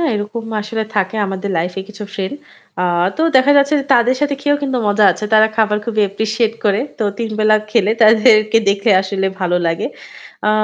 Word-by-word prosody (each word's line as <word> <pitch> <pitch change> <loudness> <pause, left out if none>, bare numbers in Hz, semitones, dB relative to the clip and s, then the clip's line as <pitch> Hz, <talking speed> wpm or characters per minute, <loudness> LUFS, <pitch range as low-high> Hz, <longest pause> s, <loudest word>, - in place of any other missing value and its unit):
হাঁ, 335 - +1
এরকম 215 +3 -5 0.2
আসলে 220 +1 -4
থাকে 195 +1 -1
আমাদের 195 +1 -5
লাইফ 175 +2 -2
এ - - -2
কিছু 210 0 -9
ফ্রেন্ড। 195 +6 -4 0.5
আ - - +1 0.3
তো 315 - -4 0.2
দেখা 260 +2 +4
যাচ্ছে 280 +2 +2
যে 275 - -7
তাদের 245 +1 +2
সাথে 285 -1 0
খেয়েও 290 0 +1
কিন্তু 265 -2 -2
মজা 205 +1 +2
আছে। 210 - -7
তারা 220 0 +6
খাবার 210 -1 +1
খুবই 220 -2 -2
অ্যাপ্রিশিয়েট 220 +3 -1
করে। 205 0 +2 0.2
তো 220 - -1
৩ 230 -1 -3
বেলা 215 0 +3 0.2
খেলে 215 -3 +2
তাদেরকে 215 0 +5
দেখে 200 +2 +1
আসলে 195 0 -2
ভালো 180 -1 0
লাগে। 165 0 -2 0.6
আ - - +4
215 Hz, 195 wpm, -16 LUFS, 200-235 Hz, 0.6 s, তারা